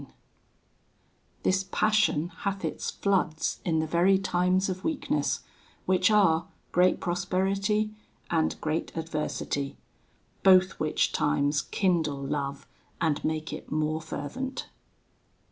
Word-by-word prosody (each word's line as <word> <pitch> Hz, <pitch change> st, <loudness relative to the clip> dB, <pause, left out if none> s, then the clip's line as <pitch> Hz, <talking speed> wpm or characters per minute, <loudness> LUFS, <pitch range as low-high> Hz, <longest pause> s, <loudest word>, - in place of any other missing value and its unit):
VIII -, -, -14 dB, 1.3 s
This 190 Hz, +1 st, +2 dB
Passion 210 Hz, -7 st, +2 dB
hath 195 Hz, -3 st, -2 dB
its 160 Hz, -, -3 dB
floods 180 Hz, -5 st, 0 dB
in 165 Hz, -2 st, +1 dB
the 160 Hz, -, +1 dB
very 175 Hz, +4 st, +4 dB
times 185 Hz, 0 st, +1 dB
of 185 Hz, 0 st, -4 dB
weakness, 315 Hz, -3 st, 0 dB, 0.4 s
which 185 Hz, +3 st, +3 dB
are 180 Hz, -6 st, +4 dB, 0.2 s
great 180 Hz, +1 st, +3 dB
prosperity, 195 Hz, +4 st, 0 dB, 0.4 s
and 160 Hz, -2 st, +1 dB
great 160 Hz, +1 st, -2 dB
adversity; 150 Hz, -3 st, -3 dB, 0.6 s
both 185 Hz, -1 st, +5 dB
which 155 Hz, 0 st, +1 dB
times 145 Hz, 0 st, +1 dB
kindle 170 Hz, -7 st, 0 dB
Love, 140 Hz, 0 st, -3 dB, 0.3 s
and 160 Hz, -4 st, 0 dB
make 155 Hz, 0 st, -2 dB
it -, -, -8 dB
more 155 Hz, +1 st, 0 dB
fervent. 255 Hz, -, -5 dB
175 Hz, 110 wpm, -28 LUFS, 155-195 Hz, 1.3 s, both